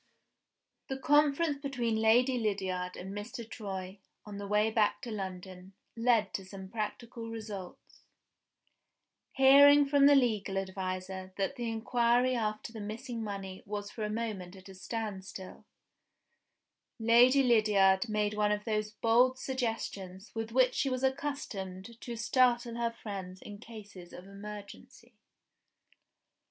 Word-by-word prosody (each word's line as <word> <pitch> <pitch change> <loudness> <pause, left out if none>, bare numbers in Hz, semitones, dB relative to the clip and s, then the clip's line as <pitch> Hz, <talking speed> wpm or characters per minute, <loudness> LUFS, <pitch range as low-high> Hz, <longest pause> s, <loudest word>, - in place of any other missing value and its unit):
THE 265 - -3
conference 290 +2 +3
between 250 -5 -1
Lady 245 +3 +4
Lydiard 190 -4 -2
and 190 +2 -7
Mr. 215 +2 -6
Troy, 195 -3 -6 0.3
on 205 -1 -8
the 200 - -5
way 210 +2 +2
back 215 -2 +2
to 240 - -5
London, 190 -2 -7 0.2
led 230 -3 +2
to 195 - -3
some 190 0 -10
practical 230 +2 -5
results. 210 -5 -8 1.3
Hearing 285 +2 +7
from 280 0 +5
her 285 - +7
legal 215 -7 +1
adviser 190 0 -4
that 195 +7 -1
the 240 -3 -3
inquiry 240 +2 +2
after 215 0 -3
the 220 - -7
missing 230 +3 -5
money 195 -2 -6
was 205 0 -5
for 220 - -5
a 210 - -1
moment 210 -5 -4
at 190 0 -14
a - - -10
standstill, 190 -2 -6 1.3
Lady 245 +4 +5
Lydiard 210 -4 +4
made 210 -1 0
one 210 0 +1
of 210 0 -1
those 215 -2 -1
bold 240 +4 +3
suggestions 225 -7 -4
with 225 0 -4
which 255 +1 +4
she 275 - 0
was 255 0 -2
accustomed 235 -7 -3
to 240 - -5
startle 240 +1 +2
her 235 0 0
friends 195 -5 -7
in 205 0 -10
cases 205 -6 -11
of 180 - -10
emergency. 210 +5 -11
215 Hz, 135 wpm, -31 LUFS, 195-240 Hz, 1.3 s, Hearing